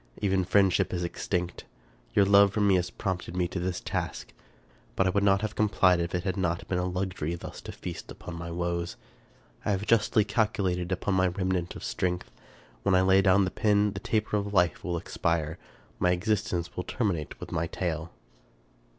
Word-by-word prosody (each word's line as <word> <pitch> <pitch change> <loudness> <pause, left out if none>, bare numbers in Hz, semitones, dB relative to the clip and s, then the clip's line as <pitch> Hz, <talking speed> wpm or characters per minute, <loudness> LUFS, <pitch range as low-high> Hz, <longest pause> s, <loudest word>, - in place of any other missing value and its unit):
Even 95 -2 +1
friend 95 +1 +4
ship 90 - +1
is 90 - -2
extinct. 90 0 -3 0.5
Your 100 - +6
love 100 0 +6
for 110 - -1
me 100 -2 +4
has 90 -1 +2
prompted 90 -2 -4
me 90 -1 +2
to 90 - -3
this 90 0 -2
task; - - -4 0.6
but 95 - +2
I 95 - +3
would 100 +1 +1
not 100 0 +4
have 110 -1 -2
complied 95 -4 +3
if 85 +1 -2
it 90 - -1
had 95 0 -2
not 85 -2 -1
been 90 - 0
a 90 - 0
luxury 90 -3 -2
thus 85 - -8
to - - -7
feast - - -7
upon 90 - -8
my 85 0 -6
woes. 85 0 -2 0.7
I - - -2
have 100 0 0
justly 110 -2 +3
calcu 105 0 0
lated 90 0 -4
upon 95 +2 0
my 95 0 +3
remnant 90 -1 -1
of - - -8
strength. 90 -1 -2 0.5
When 95 - +2
I 95 - +5
lay 95 +1 +5
down 95 +1 +4
the 90 - -3
pen 105 -1 +2
the 95 - -5
taper 105 +1 0
of 100 0 -2
life 85 -4 +2
will 90 -1 -1
expire; 80 -1 -1 0.4
my 90 - +3
existence 90 -1 -1
will 90 - -2
terminate 90 - -2
with - - -8
my 85 +1 -1
tale. 85 -2 -3
95 Hz, 200 wpm, -28 LUFS, 85-100 Hz, 0.7 s, Your